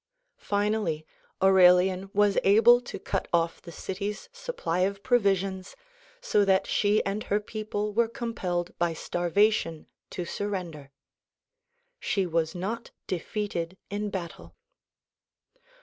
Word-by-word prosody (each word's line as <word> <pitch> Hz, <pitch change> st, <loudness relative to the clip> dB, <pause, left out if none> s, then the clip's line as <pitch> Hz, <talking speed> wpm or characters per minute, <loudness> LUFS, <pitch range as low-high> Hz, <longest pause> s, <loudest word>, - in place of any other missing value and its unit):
Finally 205 Hz, -6 st, -1 dB, 0.4 s
Aurelian 185 Hz, 0 st, +5 dB
was 205 Hz, 0 st, +3 dB
able 225 Hz, +5 st, +6 dB
to 245 Hz, -, -7 dB
cut -, -, -3 dB
off 170 Hz, -1 st, +1 dB
the 170 Hz, -, -10 dB
city's 195 Hz, +4 st, -5 dB
supply 485 Hz, -, -3 dB
of 195 Hz, +2 st, 0 dB
provisions 195 Hz, -5 st, +1 dB, 0.5 s
so 210 Hz, -, +2 dB
that 195 Hz, 0 st, +3 dB
she 205 Hz, +1 st, +2 dB
and 200 Hz, +2 st, -2 dB
her 205 Hz, -, +1 dB
people 210 Hz, -1 st, -4 dB
were 235 Hz, +2 st, +3 dB
com 235 Hz, -1 st, -5 dB
pelled 175 Hz, -5 st, -3 dB
by 170 Hz, -1 st, +1 dB
starvation 175 Hz, 0 st, 0 dB, 0.2 s
to 180 Hz, -, -5 dB
surrender. 175 Hz, -8 st, -4 dB, 1.1 s
She 195 Hz, -, 0 dB
was 165 Hz, 0 st, -1 dB
not 210 Hz, +6 st, -4 dB, 0.2 s
defeated 185 Hz, -1 st, -3 dB
in 205 Hz, +1 st, -2 dB
battle. 180 Hz, -4 st, -7 dB
195 Hz, 120 wpm, -27 LUFS, 175-210 Hz, 1.1 s, able